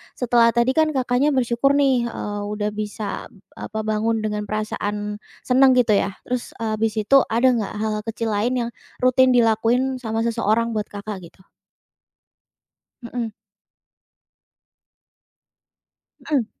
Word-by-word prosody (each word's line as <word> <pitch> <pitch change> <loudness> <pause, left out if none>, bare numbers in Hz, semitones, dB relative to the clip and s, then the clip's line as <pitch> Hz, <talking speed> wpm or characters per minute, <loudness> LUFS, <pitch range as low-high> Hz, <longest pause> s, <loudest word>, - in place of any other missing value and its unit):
setelah 240 -2 +3
tadi 235 +2 +3
kan 315 0 +4
Kakaknya 260 +3 +2
bersyukur 250 +2 +2
nih, 265 -4 +3
eee, 205 -3 -5
udah 210 0 -2
bisa 210 0 -5
ab - - -26 0.2
apa 220 +1 -5
bangun 220 +1 0
dengan 210 -1 -2
perasaan 210 -1 -3 0.3
senang 260 +1 +5
gitu 240 -3 +3
ya. 200 - -1
Terus, 250 -1 -4
eee, 225 -1 -3
habis 220 0 0
itu 245 +7 +5
ada 235 +3 +2
enggak 225 -5 -2
hal-hal 215 -1 -2
kecil 225 0 -2
lain 225 +5 0
yang - - -5 0.3
rutin 255 0 +5
dilakuin 240 +3 +2
sama 225 -1 -2
seseorang 230 0 +1
buat 210 -1 -1
Kakak 205 0 -6
gitu? 185 - -23 1.6
Mhm. 235 -1 -4 2.9
Mhm, 280 -7 0
230 Hz, 130 wpm, -22 LUFS, 215-250 Hz, 2.9 s, senang